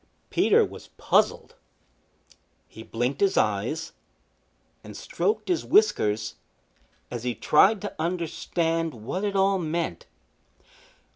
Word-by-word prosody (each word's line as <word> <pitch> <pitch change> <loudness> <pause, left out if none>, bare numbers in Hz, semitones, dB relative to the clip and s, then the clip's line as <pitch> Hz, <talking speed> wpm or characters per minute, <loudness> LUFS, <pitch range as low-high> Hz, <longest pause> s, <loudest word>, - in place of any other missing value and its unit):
Peter - - +4
was - - -11
puzzled. - - +1 1.1
He 110 - -12
blinked 120 +4 -3
his 195 -1 +2
eyes 110 +10 0 0.9
and - - -10
stroked 430 - -2
his 355 -2 0
whiskers 110 - +2 0.7
as 120 -1 -5
he 125 -1 -2
tried 195 - +4
to 205 - -5
understand 165 -1 -1
what 120 - -5
it 200 -1 -1
all 195 0 +3
meant. 170 0 -3
165 Hz, 110 wpm, -26 LUFS, 120-195 Hz, 1.1 s, Peter